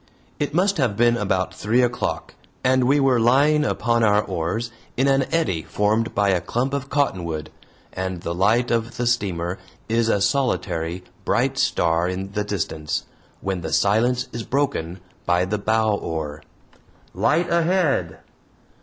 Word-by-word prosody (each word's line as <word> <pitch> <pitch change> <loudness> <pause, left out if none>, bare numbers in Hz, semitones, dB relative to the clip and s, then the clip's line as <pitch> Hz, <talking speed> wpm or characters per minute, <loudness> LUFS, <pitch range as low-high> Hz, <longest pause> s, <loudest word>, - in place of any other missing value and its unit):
It 145 - -1
must 195 +3 +2
have 120 -8 0
been 120 0 +4
about 95 -4 -1
three 115 +6 +1
o'clock, 120 0 -2 0.3
and 130 0 +3
we 140 +3 +3
were 135 -3 +3
lying 140 +6 +4
upon 115 -4 +1
our 105 -1 +4
oars 110 +9 -3 0.3
in 135 +2 +3
an 135 -1 +2
eddy 95 - 0
formed 110 +6 0
by 100 -1 +2
a 90 -2 +2
clump 130 +3 -2
of 140 -1 -3
cottonwood, 85 - -1 0.4
and 95 -2 -4
the 85 - -3
light 110 +7 +2
of 115 +1 -1
the 120 - -1
steamer 95 -7 -1 0.3
is 115 0 +1
a 105 - +2
solitary, 90 -8 -1 0.2
bright - - +1
star 85 +1 +1
in 95 +1 -4
the 105 +1 -1
distance, 80 -7 -3 0.4
when 95 -2 -2
the 80 -2 -5
silence 120 +7 +2
is 120 - -4
broken 115 - -2 0.3
by 90 +1 +3
the 105 +2 -2
"bow 110 +1 +2
oar": 80 -6 -4 0.7
"Light 155 - +1
ahead." 160 - +1
110 Hz, 155 wpm, -22 LUFS, 90-125 Hz, 0.7 s, been